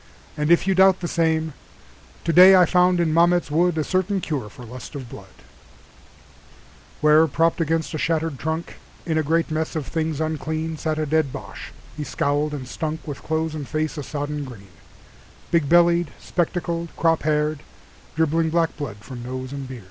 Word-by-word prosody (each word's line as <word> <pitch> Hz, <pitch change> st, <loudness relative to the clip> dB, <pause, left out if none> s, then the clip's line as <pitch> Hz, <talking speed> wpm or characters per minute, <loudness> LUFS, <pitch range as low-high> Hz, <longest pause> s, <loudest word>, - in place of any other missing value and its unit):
and 150 Hz, +1 st, -1 dB
if 170 Hz, +1 st, +4 dB
you 195 Hz, -, +2 dB
doubt 190 Hz, 0 st, +5 dB
the 175 Hz, -, -3 dB
same, 160 Hz, -2 st, 0 dB, 0.7 s
Today 180 Hz, +3 st, +8 dB
I 180 Hz, -1 st, +7 dB
found 180 Hz, +1 st, +3 dB
in 165 Hz, -2 st, +1 dB
Mametz 170 Hz, -1 st, +3 dB
WoodA 165 Hz, 0 st, +2 dB
certain 190 Hz, +1 st, 0 dB
cure 145 Hz, -, -4 dB
for 120 Hz, +4 st, -12 dB
lust 125 Hz, +5 st, -10 dB
of 135 Hz, -3 st, -6 dB
blood:Where, 150 Hz, -, -4 dB
propped 165 Hz, +3 st, +1 dB
against 165 Hz, 0 st, -1 dB
a 155 Hz, -, -3 dB
shattered 160 Hz, -3 st, -1 dB
trunk, 160 Hz, +1 st, -4 dB, 0.3 s
In 160 Hz, -2 st, 0 dB
a -, -, +1 dB
great 165 Hz, +2 st, 0 dB
mess 155 Hz, +1 st, -2 dB
of 155 Hz, -3 st, -2 dB
things 160 Hz, -1 st, -2 dB
unclean, 160 Hz, 0 st, -3 dB
Sat 155 Hz, 0 st, -2 dB
a 155 Hz, -, 0 dB
dead 155 Hz, -2 st, +1 dB
Boche; 140 Hz, -, -8 dB, 0.2 s
he 150 Hz, -, -4 dB
scowled 145 Hz, +1 st, -1 dB
and 135 Hz, -3 st, -6 dB
stunkWith 150 Hz, +1 st, -5 dB
clothes 160 Hz, 0 st, -2 dB
and 150 Hz, -3 st, -5 dB
face 155 Hz, 0 st, -2 dB
a 150 Hz, -, -4 dB
sodden 145 Hz, +1 st, -4 dB
green, 110 Hz, -8 st, -11 dB, 0.8 s
Big 165 Hz, -5 st, +2 dB
bellied, 170 Hz, -1 st, +4 dB
spectacled, 170 Hz, -1 st, -2 dB
crop 165 Hz, -1 st, +2 dB
haired, 150 Hz, 0 st, 0 dB, 0.6 s
Dribbling 160 Hz, +1 st, +1 dB
black 165 Hz, 0 st, +1 dB
blood 130 Hz, -9 st, -5 dB
from 120 Hz, +2 st, -9 dB
nose 130 Hz, +1 st, -6 dB
and 140 Hz, -1 st, -6 dB
beard. 130 Hz, -1 st, -8 dB
160 Hz, 170 wpm, -23 LUFS, 145-165 Hz, 0.8 s, Today